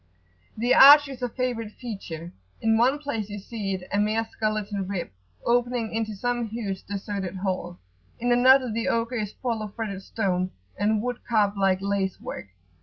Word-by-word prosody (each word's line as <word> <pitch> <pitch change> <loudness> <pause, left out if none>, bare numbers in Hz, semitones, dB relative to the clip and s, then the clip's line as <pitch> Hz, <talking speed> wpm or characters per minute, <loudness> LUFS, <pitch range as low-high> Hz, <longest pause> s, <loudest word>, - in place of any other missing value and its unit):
The 240 +3 +2
arch 290 +2 +9
is 265 -2 -9
a 245 - -1
favourite 230 -3 -3
feature: 175 -8 -7 0.3
in 225 0 +2
one 250 +5 +3
place 230 -8 -4
you 205 - -5
see 200 -1 -4
it 180 -1 -8
a 205 - +2
mere 215 +2 +1
skeleton 215 -3 -2
rib 185 - -4 0.3
opening 240 -2 +1
into 220 -1 -2
some 240 +2 -1
huge 205 -4 -4
deserted 195 -2 -4
hall; 185 -2 -3 0.4
in 245 +1 0
another 255 0 +5
the 230 +1 -2
ogre 230 +2 0
is 210 -2 -3
full 235 -4 -3
of 210 -2 -7
fretted 205 -4 -4
stone 185 -3 -1 0.3
and 210 +2 +1
wood 245 -1 -3
carved 210 -3 +2
like 195 -1 +1
lace 200 -1 -1
work. - - -7
215 Hz, 175 wpm, -26 LUFS, 195-240 Hz, 0.4 s, arch